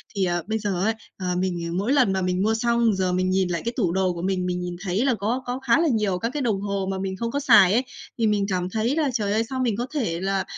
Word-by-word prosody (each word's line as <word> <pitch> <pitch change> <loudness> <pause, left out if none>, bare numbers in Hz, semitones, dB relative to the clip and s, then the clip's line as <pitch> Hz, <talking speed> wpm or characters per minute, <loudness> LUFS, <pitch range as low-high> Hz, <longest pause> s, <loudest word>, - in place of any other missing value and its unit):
Thì, 195 -2 +1
ờ, 175 -1 -1
bây 220 +1 -1
giờ 195 -4 -1
ấy, 220 +2 +2 0.2
ờ, 180 -2 -2
mình 175 -2 -2
mỗi 210 +8 +1
lần 250 -9 +3
mà 190 - 0
mình 180 +1 0
mua 220 +2 +2
xong 235 -1 +2
giờ 185 -1 0
mình 185 0 +1
nhìn 190 0 +2
lại 170 -1 -2
cái 235 - 0
tủ 190 -9 +1
đồ 185 0 +1
của 170 - -6
mình, 185 0 -1
mình 180 0 -2
nhìn 175 0 -4
thấy 195 +5 0
là 260 -3 +2
có 230 +6 -1
có 250 +1 -3
khá 235 - +5
là 335 - +2
nhiều 210 -8 0
các 230 - -1
cái 295 - -2
đồng 215 -6 0
hồ 200 -1 -2
mà 190 - -3
mình 190 0 -3
không 230 +3 -3
có 285 - -1
xài 220 -9 +6
ấy, 240 +4 +3 0.3
thì 230 -2 +2
mình 205 -2 +1
cảm 180 -1 -1
thấy 225 +7 0
là 310 -3 +1
trời 210 -4 -1
ơi, 220 +2 +2
sao 260 - -3
mình 235 -5 0
có 240 - -1
thể 195 - -1
là, 195 0 0
200 Hz, 300 wpm, -24 LUFS, 185-235 Hz, 0.3 s, xài